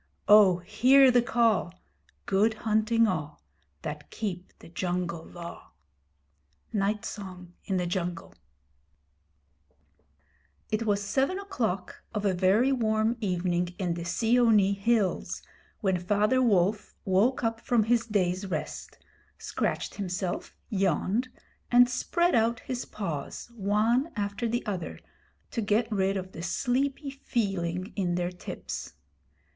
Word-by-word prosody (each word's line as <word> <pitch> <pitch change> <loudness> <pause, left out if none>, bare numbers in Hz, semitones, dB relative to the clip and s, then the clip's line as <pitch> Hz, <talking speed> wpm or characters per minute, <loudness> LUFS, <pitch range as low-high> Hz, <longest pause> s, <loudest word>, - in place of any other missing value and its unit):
Oh 205 -4 +7
hear 255 +9 +5
the 245 0 +5
call! 230 -6 +2 0.5
Good 210 +3 +2
hunting 220 +1 +3
all 155 -6 -3 0.4
That 150 0 -6
keep 185 -4 -5
the - - -14
Jungle 175 -1 -3
Law! 170 0 -10 1.0
Night 205 0 0
Song 180 -3 -8
in 190 - 0
the 180 - 0
Jungle. 175 -1 -3 2.4
It 220 +1 -1
was 205 -1 +1
seven 270 - 0
o'clock 230 - -3
of 210 0 -1
a 195 - +3
very 195 +8 +3
warm 220 -2 +1
evening 180 -2 -1
in 180 -4 -1
the 170 0 -5
Seeonee 220 +2 +3
hills 200 -1 0 0.4
when 190 -4 +1
Father 210 +7 +2
Wolf 205 -3 +2
woke 205 +8 +2
up 225 0 0
from 235 -3 +2
his 230 +1 +1
day's 190 -2 0
rest, - - -5 0.4
scratched - - -2
himself, 185 -2 -4
yawned, 195 - 0 0.4
and 245 0 +7
spread 345 +8 +1
out 230 0 +2
his 250 -1 -4
paws 180 +2 -5
one 225 - +1
after 205 +2 -2
the 240 +2 -1
other 190 -6 -4 0.5
to 230 - -2
get 220 +2 +1
rid 195 -1 +1
of 185 0 -5
the 165 - -8
sleepy 275 - -1
feeling 195 -8 -2
in 180 -4 0
their 175 0 -1
tips. 180 - -7
205 Hz, 125 wpm, -28 LUFS, 180-230 Hz, 2.4 s, Oh